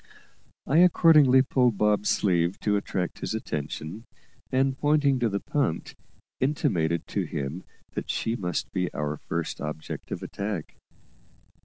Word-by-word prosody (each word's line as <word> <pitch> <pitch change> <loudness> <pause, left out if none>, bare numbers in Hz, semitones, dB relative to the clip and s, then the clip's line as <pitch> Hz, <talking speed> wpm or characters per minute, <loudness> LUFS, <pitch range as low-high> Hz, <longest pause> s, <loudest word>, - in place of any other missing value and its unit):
I 145 - +2
accordingly 155 -7 +6
pulled 125 -5 +2
Bob's 105 0 +2
sleeve 90 -2 +1
to 105 -1 +1
attract 95 -3 -2
his - - -3
attention, 80 - -5 0.5
and, 135 0 +2
pointing 145 -2 +2
to 120 -2 +2
the 100 0 -1
punt, 135 - -1 0.5
intimated 85 - 0
to - - -1
him 70 +6 -4 0.3
that - - -5
she 115 - -1
must 90 -7 -3
be 90 -1 -1
our 75 0 -2
first - - -4
object 75 +1 -6
of - - -5
attack. 100 -5 -4
105 Hz, 135 wpm, -26 LUFS, 85-130 Hz, 0.5 s, accordingly